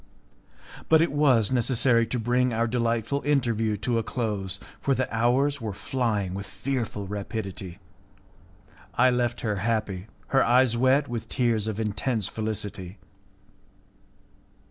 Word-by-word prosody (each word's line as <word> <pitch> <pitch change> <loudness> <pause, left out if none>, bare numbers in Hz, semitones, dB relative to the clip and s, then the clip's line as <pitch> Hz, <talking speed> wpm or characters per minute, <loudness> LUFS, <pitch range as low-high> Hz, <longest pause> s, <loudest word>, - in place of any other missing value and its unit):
But 160 0 +6
it 170 - 0
was 135 -7 +3
necessary 120 -1 +2
to 125 - -2
bring 125 +2 +1
our 115 +1 +2
delightful 115 +3 0
interview 115 -7 +1
to 120 -2 +2
a - - +1
close, 105 -5 -3 0.2
for 135 - +1
the 130 0 0
hours 130 +4 +2
were 110 -3 -3
flying 110 -8 -1
with 100 +1 -5
fearful 120 -7 -3
rapidity. 100 -2 -5 1.2
I 125 +1 +5
left 120 -1 0
her 105 -3 -1
happy, 105 -2 -1 0.2
her 135 - +4
eyes 125 0 +4
wet 130 +4 +3
with 120 -3 -5
tears 115 -4 +1
of 110 -1 -3
intense 110 0 -1
felicity. 105 -3 -4
115 Hz, 130 wpm, -26 LUFS, 105-125 Hz, 1.2 s, But